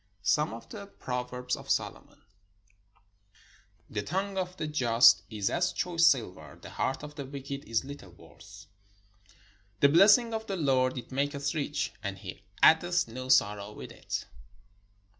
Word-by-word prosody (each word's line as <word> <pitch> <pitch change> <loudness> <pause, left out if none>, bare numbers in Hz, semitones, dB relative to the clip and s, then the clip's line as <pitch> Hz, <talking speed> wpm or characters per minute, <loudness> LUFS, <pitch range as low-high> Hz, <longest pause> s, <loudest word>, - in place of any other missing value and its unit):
SOME 150 +7 +2
OF 115 - -12
THE 200 -2 -9
PROVERBS 125 -6 -4
OF - - -12
SOLOMON - - -3 1.6
The 105 - -3
tongue 195 - -3
of 185 -1 -3
the 155 - -3
just 125 -6 +5
is 105 -3 -2
as 175 +1 +1
choice 170 -2 +2
silver: 90 - -1
the - - -11
heart 135 - -2
of 150 0 -8
the 145 -1 -6
wicked 140 0 -7
is 115 0 0
Httle 135 -11 -11
worth. 80 -3 -15 1.1
The 140 - +6
blessing 210 +8 +6
of 220 0 -4
the 195 - -3
Lord, 130 -4 +1
it 120 0 -8
maketh 140 +1 -1
rich, 145 -1 -2
and 100 -2 -4
he 95 0 -9 0.2
add 160 +2 +7
eth 175 -3 0
no 130 +3 -7
sorrow 105 -5 +2
with - - -10
it. - - -5
140 Hz, 155 wpm, -29 LUFS, 115-165 Hz, 1.6 s, add